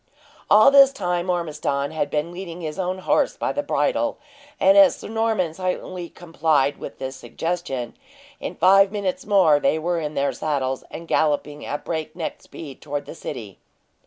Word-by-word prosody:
All 215 +6 +7
this 275 -1 +8
time 180 -6 -2
Ormiston 150 -5 -1
had 155 -2 -2
been 150 +3 -2
leading 175 -1 -7
his 155 +1 -5
own 185 0 -1
horse 185 - +1
by - - -1
the - - -1
bridle, - - 0 0.4
and 290 - +5
as 295 -2 +7
Sir - - -10
Norman 220 -7 0
silently 180 -1 -4
complied 155 -5 0
with - - -8
this 130 0 -5
suggestion, 130 -1 -4 0.4
in - - -5
five 195 +2 +5
minutes 200 -3 -3
more 185 -8 +5
they 155 - +2
were 170 +2 -1
in 150 -1 -4
their 140 0 0
saddles, 135 -4 -2
and 165 - -9
galloping 150 -1 0
at 145 - -4
break 160 -1 -4
neck 170 -3 -5
speed 140 -5 -11
toward 145 -1 -4
the - - -8
city. 105 - -8
165 Hz, 170 wpm, -23 LUFS, 145-185 Hz, 0.4 s, this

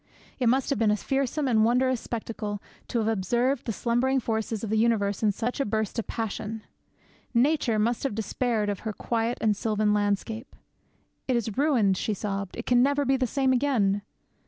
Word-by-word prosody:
It 245 -3 +3
must 265 +3 +1
have 275 - 0
been 225 -2 +3
a 210 - +4
fearsome 275 +5 -1
and 220 -4 +4
wondrous 250 +2 +2
spectacle 215 -3 -4 0.3
to - - -2
have 220 -2 +1
observed 235 +6 +1
the - - +1
slumbering 240 +5 +1
forces 220 -2 -2
of 215 - -3
the 220 - +2
universe 215 -3 +1
in 215 -2 +3
such 240 +7 -3
a - - +3
burst 220 0 -1
of 230 - -4
passion! 220 -1 -4 0.7
Nature 250 -2 +3
must 230 +3 +1
have 275 -7 -2
despaired 225 0 -1
of 200 -2 -2
her 220 -1 -4
quiet 230 +2 -1
and 215 -2 +3
sylvan 215 0 +1
landscape. 210 +3 -1 0.7
'It 255 - +2
is 225 -3 -1
ruined,' 245 -10 +3
she 215 - -1
sobbed; 200 -1 -4
'it 235 - -5
can 245 -1 +4
never 285 +2 +2
be 270 +1 +3
the 255 -1 0
same 265 +2 +1
again!' 235 -7 +2
225 Hz, 190 wpm, -27 LUFS, 210-255 Hz, 0.7 s, a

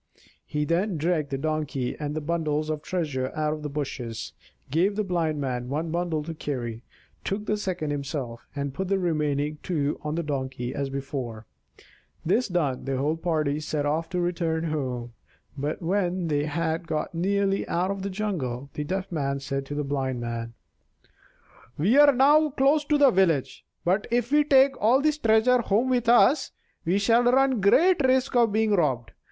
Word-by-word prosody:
He 150 0 -1
then 175 +4 0
dragged 155 -2 0
the 135 - -2
Donkey 150 -3 -2
and 150 -1 -4
the 155 - -2
bundles 155 -1 -1
of 155 -1 -3
treasure 145 -8 -2
out 155 0 0
of 155 - -6
the 150 - -4
bushes, 135 -5 -5 0.4
gave 180 +7 +2
the 215 - 0
Blind 165 -5 -1
Man 125 -3 -3
one 155 +4 -2
bundle 170 -2 -1
to 165 +2 -5
carry, 120 -7 -4 0.4
took 205 +2 -3
the 210 - 0
second 185 -7 -3
himself, 140 -5 -5
and 140 -1 -3
put 190 +6 -3
the 195 +1 +1
remaining 150 -4 -1
two 150 -5 -1
on 150 0 -2
the 170 - -1
Donkey, 130 -4 -3
as 140 -1 -2
before. 135 -5 -5 0.8
This 225 +9 +2
done, 155 -9 -1
the 135 -1 -1
whole 145 +4 0
party 155 -3 -1
set 150 -1 -2
off 155 +3 -1
to 180 -1 -2
return 170 -2 -1
home. 130 -7 -3 0.4
But 145 +5 -3
when 180 -1 0
they 145 -1 +1
had 160 +2 -2
got 155 0 -2
nearly 195 +3 0
out 180 +3 0
of 195 -1 -4
the 200 - -3
jungle 145 - -3
the 150 - -3
Deaf 185 +5 -3
Man 140 -4 -1
said 135 0 -4
to 145 - -5
the 150 - -1
Blind 135 -3 -2
Man: 115 -1 -5 1.2
"We 195 - +3
are 290 -1 +8
now 295 +4 +5
close 280 +2 +2
to 300 0 +2
the 280 -2 +6
village; 170 - +1 0.2
but 190 +4 +1
if 240 +1 0
we 295 0 +4
take 270 -1 +5
all 235 +6 +5
this 305 +1 +1
treasure 230 +1 +4
home 235 +4 +1
with 245 -2 +1
us, 260 +4 +5 0.4
we 175 +4 +2
shall 230 +4 +4
run 260 -2 +3
great 320 - +4
risk 260 0 +2
of 235 -3 +4
being 220 +1 +1
robbed. 135 - +1
160 Hz, 180 wpm, -26 LUFS, 145-200 Hz, 1.2 s, are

